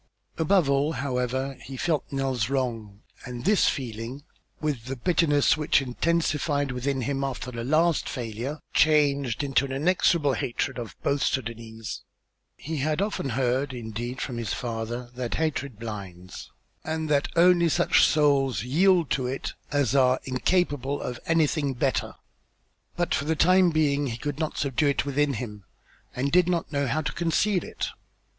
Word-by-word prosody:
Above 165 0 +3
all, 140 +3 +2
however, 130 0 -2
he 135 0 -8
felt 160 +2 0
Nell's 135 -5 -1
wrong 115 -6 -3 0.2
and 125 -2 -7
this 205 +1 +4
feeling, 120 +2 -5 0.4
with 145 -7 -2
the 130 +2 -4
bitterness 145 +1 +3
which 155 -1 +2
intensified 145 +1 0
within 130 +2 -2
him 135 +2 -1
after 130 -2 -4
the 115 -1 -5
last 155 +5 +2
failure, 125 +4 -4
changed 140 -4 +3
into 135 -2 +2
an 135 - -4
inexorable 150 0 +2
hatred 125 +2 -2
of 115 -4 -7
both 140 0 +1
Sudânese. 115 -3 -3 0.6
He 160 +1 -5
had 150 +3 0
often 200 -8 -1
heard, 130 +2 0
indeed, 120 +2 -5
from 125 -3 -4
his 110 -5 -2
father 120 +1 -4
that 125 -1 -3
hatred 140 -6 -2
blinds, 100 -5 -8 0.3
and 160 0 -2
that 145 -1 +2
only 170 0 +5
such 175 +2 +3
souls 140 -5 +3
yield 170 +5 +3
to 125 +1 0
it 135 +2 -4 0.2
as 140 -3 +1
are 130 -1 +4
incapable 145 0 0
of 125 -1 -5
anything 155 -4 +1
better; 130 +2 -1 0.8
but 175 0 0
for 140 - 0
the 160 +1 +1
time 185 +3 +5
being 145 -3 +1
he 115 -2 -4
could 145 +3 -4
not 155 -2 -2
subdue 140 +1 +1
it 140 -1 +1
within 145 0 +1
him, 105 -3 -6 0.5
and 135 +3 -1
did 180 +1 +4
not 170 -4 -1
know 140 -2 0
how 155 +6 0
to 140 - -2
conceal 175 +3 +1
it. - - -4
140 Hz, 155 wpm, -26 LUFS, 125-155 Hz, 0.8 s, only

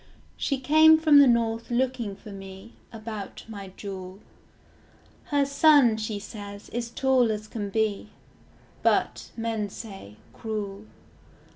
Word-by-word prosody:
She 275 -2 -1
came 315 +4 +6
from 310 -2 +6
the 280 - +7
north 230 -1 +1
looking 240 -4 -1
for 205 +1 -12
me, 195 +2 -10 0.2
About 215 -3 -7
my 200 -3 -8
jewel. 190 -2 -7 1.1
Her 285 -1 +1
son, 280 -5 +5
she 215 -1 -3
says, 205 -1 -9
is 235 0 -4
tall 255 -1 +2
as 215 0 -4
can 210 -2 -5
be; 215 0 -1 0.7
But, - - +1
men 225 -2 -2
say, 195 - -10 0.2
cruel. 210 -2 -5
220 Hz, 125 wpm, -26 LUFS, 205-250 Hz, 1.1 s, the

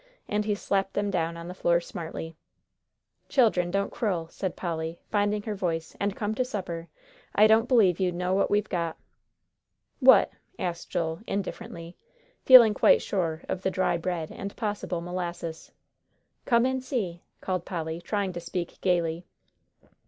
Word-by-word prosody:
And 210 0 0
he 210 -1 +1
slapped 195 -1 -1
them 205 0 0
down 170 -2 -1
on 170 0 -8
the 180 - -6
floor 170 -2 +2
smartly. 165 -1 -7 0.9
"Children, 215 -9 +3
don't 200 +2 -1
quarrel," 175 -7 -2
said 185 0 -4
Polly, 165 -1 -3
finding 205 0 +1
her 215 - -3
voice, 165 -5 -3
"and 200 0 -1
come 210 0 -2
to 255 - 0
supper. 180 -8 -5 0.5
I 210 - +7
don't 220 +2 +5
b'lieve 200 -9 +4
you 185 -2 +2
know 180 +1 -1
what 195 +1 +2
we've 210 0 +1
got." 170 -3 -2 1.0
"What?" 260 -6 +7 0.3
asked 175 -5 -4
Joel, 160 -1 -2
indifferently, 195 -3 -5 0.5
feeling 240 -5 +9
quite - - +5
sure 165 -5 -2
of 185 - -3
the 190 - +1
dry 185 -2 +1
bread 170 -2 -3
and 200 0 -6
possible 205 -5 -3
molasses. 175 -2 -5 0.7
"Come 235 -1 +4
and 260 0 -1
see," 195 - -3 0.2
called 185 -2 -2
Polly, 165 -2 -4
trying 200 0 -2
to 175 - -4
speak 170 0 -5
gayly. 170 -2 +1
185 Hz, 155 wpm, -27 LUFS, 170-205 Hz, 1.0 s, feeling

